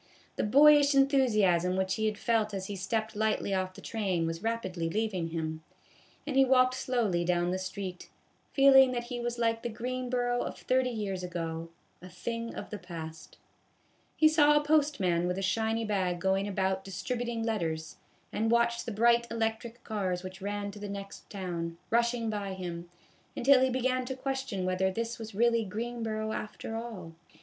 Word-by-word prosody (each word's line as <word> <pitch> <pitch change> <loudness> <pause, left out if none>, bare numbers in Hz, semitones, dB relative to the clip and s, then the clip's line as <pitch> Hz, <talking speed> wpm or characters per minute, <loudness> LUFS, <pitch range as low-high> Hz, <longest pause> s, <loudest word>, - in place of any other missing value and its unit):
The - - -1
boyish 285 +4 +6
enthusiasm 215 - +3
which 190 0 0
he 220 +2 0
had 210 -1 -2
felt 215 -2 0
as 190 -1 -4
he 205 - -5
stepped 220 +3 -2
lightly 215 -2 0
off 185 -1 -1
the - - -11
train 190 -7 -1
was 165 +1 -3
rapidly 190 -7 -2
leaving 200 -3 -1
him, 160 -1 -4 0.6
and 290 -2 -3
he 270 - +7
walked 255 -1 +4
slowly 235 -9 0
down 175 0 +1
the 185 - -1
street, 185 -1 -6 0.4
feeling 270 -2 +7
that 240 -1 -2
he 240 - -3
was 240 0 -3
like 230 -1 +1
the 240 - -3
Greenboro 245 +1 -1
of - - -4
thirty 255 0 +1
years 205 -5 -3
ago, 165 -2 -4 0.3
a 180 - -10
thing 230 +5 -5
of - - -7
the 210 - -5
past. 160 -3 -9 0.8
He 315 - +6
saw 295 -1 +5
a - - -5
postman 280 - +2
with 180 +1 -1
a 195 - -2
shiny 225 +3 0
bag 185 -4 0
going 190 +2 +1
about 190 -1 -1
distributing 235 +4 -3
letters, 165 -8 -2 0.4
and 225 +1 0
watched 235 0 +2
the - - -2
bright 235 +2 +3
electric 225 +1 -3
cars 190 -4 -2
which 185 +1 -8
ran 205 0 -3
to 205 - -11
the 205 0 -6
next 200 0 -8
town, 170 -4 -4
rushing 235 0 +2
by 205 -3 -3
him, 175 -2 -6 0.5
until 265 +1 +5
he 260 - +3
began 255 0 0
to 265 +1 -4
question 265 -7 -3
whether 185 +1 +1
this 230 +4 -3
was 220 -2 -8
really 230 +1 +3
Greenboro 220 +1 -3
after 215 +1 -5
all. 220 -8 -6
215 Hz, 175 wpm, -30 LUFS, 185-240 Hz, 0.8 s, he